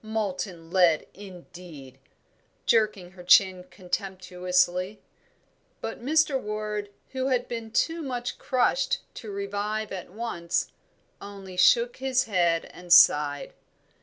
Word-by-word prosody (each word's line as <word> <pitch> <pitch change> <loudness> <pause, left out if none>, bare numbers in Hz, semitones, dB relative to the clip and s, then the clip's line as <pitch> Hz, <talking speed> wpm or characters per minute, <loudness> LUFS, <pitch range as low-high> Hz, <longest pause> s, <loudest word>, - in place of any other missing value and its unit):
Molten 190 -6 -4
lead, 175 -4 +4
indeed!" 175 -8 -12 0.7
jerking 210 -5 +1
her 180 -1 -13
chin 185 -3 +5
contemptuously. 180 0 -1 0.8
But 225 +1 -6
Mr. 305 0 +2
Ward, 210 -1 -4 0.2
who 260 0 -2
had 250 -2 0
been 230 -2 -6
too 330 +8 0
much 245 -4 -4
crushed 485 - +1
to 220 - -9
revive 205 +2 -3
at 185 -2 -6
once, 180 -5 -3 0.5
only 195 -2 -10
shook 235 +6 +4
his 260 -1 +1
head 175 -6 +1
and 180 -1 -11
sighed. 145 -4 +5
200 Hz, 110 wpm, -26 LUFS, 180-230 Hz, 0.8 s, chin